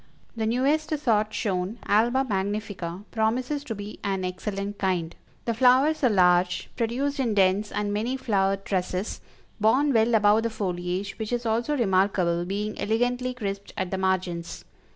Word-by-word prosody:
The 220 -1 -1
newest 300 +6 +1
sort 215 -7 +1
shown, 195 0 -2
Alba 235 +6 +3
Magnifica, 200 -3 -3
promises 250 +6 0
to 225 - -4
be 205 +1 -8
an 195 -2 -1
excellent 200 +2 -4
kind; 180 -4 -1 0.3
the 235 - 0
flowers 260 +6 +4
are 255 - +5
large, 180 -3 +3
produced 265 +5 -1
in 235 -5 0
dense 195 +2 +2
and 205 0 -2
many 235 +6 -1
flowered 195 -5 0
trusses, 185 +1 -2 0.4
borne 265 +7 +3
well 225 0 +3
above 210 0 +5
the 230 - -1
foliage, 185 -1 -3
which 220 0 -4
is 240 0 -1
also 235 +6 0
remarkable 185 -5 +2
being 205 +3 -3
elegantly 245 +3 0
crisped 200 -4 -5
at 185 -1 -2
the 190 - -1
margins. 185 -3 -2
210 Hz, 150 wpm, -26 LUFS, 190-240 Hz, 0.4 s, are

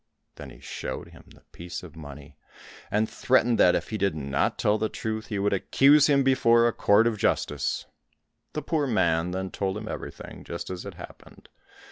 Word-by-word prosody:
Then - - -10
he - - -14
showed - - -6
him - - -16
the - - -19
piece 85 +1 -8
of 80 -4 -12
money, 75 -2 -11 0.5
and 110 +1 +1
threatened 120 -1 +2
that 90 - +6
if - - -3
he 110 - -3
did 100 -4 +1
not 70 -2 -1
tell 105 +1 +1
the 110 0 0
truth 110 0 -4
he 105 - -3
would 100 +1 +1
accuse 140 +9 +5
him 140 -1 +4
before 120 -3 +4
a 120 - 0
court 100 +3 +4
of 115 -3 0
justice. 70 -6 -1 0.7
The 150 - -4
poor 150 -1 0
man 85 -7 +1
then 95 +1 -4
told 95 0 -2
him 110 0 -7
everything, - - -8
just 85 +2 -6
as 90 -1 -6
it - - -8
happened. - - -13
105 Hz, 190 wpm, -26 LUFS, 85-115 Hz, 0.7 s, that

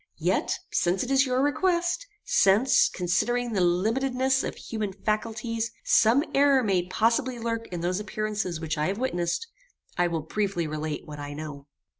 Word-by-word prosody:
Yet, - - 0
since 180 +2 +1
it 255 - -4
is 270 0 +4
your 255 +1 +1
request; 350 +8 +1 0.2
since, 210 +7 +4
considering 230 +7 0
the 195 - +1
limitedness 250 +9 +1
of - - -4
human 215 -4 -4
faculties, 225 +2 -2
some 230 +6 +4
error 275 -2 +4
may 185 -4 +1
possibly 235 +6 +1
lurk 230 0 -3
in 175 -2 -5
those 180 +2 -1
appearances 210 -4 -3
which 160 -1 -3
I 150 - +1
have 195 - -2
witnessed, 175 - -1 0.5
I 175 - +4
will 165 -2 -2
briefly 195 0 -1
relate 155 0 -4
what 150 -1 -9
I 145 0 -6
know. 145 -2 -8
215 Hz, 160 wpm, -26 LUFS, 175-250 Hz, 0.5 s, is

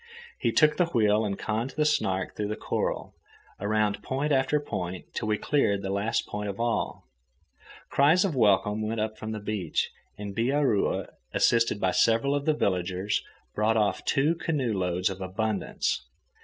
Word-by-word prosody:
He - - +1
took 150 -1 +4
the 175 - +3
wheel 110 -7 +3
and 100 -2 -2
conned 115 +5 -2
the 150 - +3
Snark 95 -11 0
through 105 - -2
the 105 - -2
coral, - - -2 0.5
around 105 0 0
point 140 +6 -2
after 135 +2 +2
point 90 -10 -5
till - - -3
we 105 -1 +1
cleared 100 -9 +1
the 95 - -2
last 105 +4 0
point 105 0 -4
of 100 - -6
all. 120 0 -1 0.9
Cries 160 +7 +4
of 175 -7 -1
welcome 105 -2 +3
went 110 +1 -2
up 110 0 -2
from 110 0 -5
the 110 - -4
beach, 105 -5 -2 0.3
and 100 -1 -6
Bihaura, 130 -2 +1 0.3
assisted 115 -3 +3
by 95 -2 +2
several 115 +8 +3
of 145 0 -1
the 155 - +3
villagers, 95 -2 0 0.3
brought 110 +1 +2
off 105 -2 +1
two 145 +4 +2
canoe 150 -8 -1
loads 90 -1 0
of 95 0 -7
abundance. 100 +2 -1
110 Hz, 170 wpm, -27 LUFS, 100-135 Hz, 0.9 s, took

